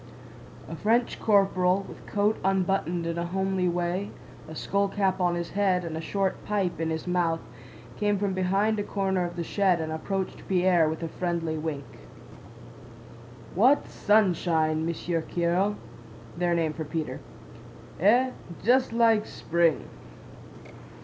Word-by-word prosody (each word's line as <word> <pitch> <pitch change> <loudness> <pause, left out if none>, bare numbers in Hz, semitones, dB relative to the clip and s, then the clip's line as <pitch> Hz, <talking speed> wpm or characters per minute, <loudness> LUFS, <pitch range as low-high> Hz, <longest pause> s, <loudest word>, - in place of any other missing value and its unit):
A - - -6
French 235 +3 +1
corporal, 195 -2 +3
with - - -12
coat 210 +1 +1
unbuttoned 185 -3 0
in 170 0 -2
a 170 - -2
homely 190 0 0
way, 175 +3 -1 0.4
a 160 - -9
skullcap 195 +1 0
on 175 -1 +2
his 170 0 -4
head, 190 -3 +1
and 160 -1 -4
a 160 - -3
short 195 +3 -2
pipe 195 -5 -1
in 165 - 0
his 160 0 -3
mouth, 175 -2 +1 0.6
came 205 -1 +1
from 195 -1 -1
behind 195 +4 +1
a - - 0
corner 190 -3 -1
of 175 0 -6
the 170 - -3
shed 185 0 +2
and 160 -1 -3
approached 190 +4 -4
Pierre 180 -3 +3
with 160 +2 -4
a - - -1
friendly 170 -1 -2
wink. 155 -3 -4 1.7
"What 255 +10 +4
sunshine, 165 -6 +2
Monsieur 170 0 -2
Kiril!" 175 +5 0 0.6
(Their 175 0 +1
name 160 -2 0
for 160 - -5
Pierre.) 155 +1 -4 0.8
"Eh? 240 +8 +4 0.3
Just 250 +1 +3
like 225 -2 +3
spring!" 170 -1 0
180 Hz, 140 wpm, -27 LUFS, 170-200 Hz, 1.7 s, What